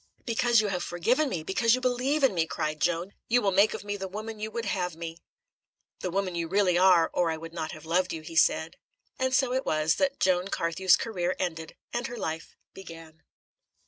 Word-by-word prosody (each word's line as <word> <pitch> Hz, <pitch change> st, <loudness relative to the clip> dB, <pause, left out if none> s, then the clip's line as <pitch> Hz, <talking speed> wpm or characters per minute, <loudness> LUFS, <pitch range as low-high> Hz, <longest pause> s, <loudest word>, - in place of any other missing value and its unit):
"Because 235 Hz, -1 st, +3 dB
you 210 Hz, -, -1 dB
have 180 Hz, -2 st, -2 dB
forgiven 245 Hz, -, +1 dB
me, 170 Hz, -5 st, -3 dB
because 230 Hz, +7 st, +2 dB
you -, -, -3 dB
believe 255 Hz, +4 st, 0 dB
in 265 Hz, -, +4 dB
me," 165 Hz, -2 st, 0 dB
cried 155 Hz, -1 st, -3 dB
Joan, 175 Hz, +3 st, 0 dB
"you 245 Hz, +2 st, +4 dB
will 200 Hz, -5 st, +1 dB
make 200 Hz, +3 st, +4 dB
of -, -, -7 dB
me 205 Hz, 0 st, -4 dB
the 190 Hz, -1 st, -5 dB
woman 215 Hz, +3 st, -7 dB
you 215 Hz, +1 st, -3 dB
would 230 Hz, +1 st, -4 dB
have 180 Hz, -4 st, -2 dB
me!" 165 Hz, 0 st, -7 dB, 0.8 s
"The 185 Hz, -, -3 dB
woman 190 Hz, 0 st, -1 dB
you 170 Hz, -1 st, -2 dB
really 190 Hz, 0 st, +2 dB
are, 180 Hz, -2 st, +5 dB
or 175 Hz, -2 st, +1 dB
I 160 Hz, -, -2 dB
would 165 Hz, +1 st, -9 dB
not 160 Hz, -2 st, -4 dB
have 155 Hz, 0 st, -11 dB
loved 180 Hz, +3 st, +1 dB
you," 160 Hz, -1 st, -5 dB
he 165 Hz, -, -9 dB
said. 160 Hz, 0 st, +2 dB, 0.4 s
And 260 Hz, 0 st, +1 dB
so 260 Hz, -1 st, +2 dB
it 260 Hz, +1 st, 0 dB
was 155 Hz, +1 st, +1 dB
that 280 Hz, -1 st, 0 dB
Joan 185 Hz, 0 st, +2 dB
Carthew's 180 Hz, +1 st, +2 dB
career 185 Hz, -5 st, -2 dB
ended 165 Hz, -3 st, -4 dB, 0.2 s
and 240 Hz, 0 st, -2 dB
her 240 Hz, -, -7 dB
life 160 Hz, -5 st, -5 dB, 0.2 s
began. 165 Hz, -3 st, -12 dB
185 Hz, 215 wpm, -28 LUFS, 165-225 Hz, 0.8 s, are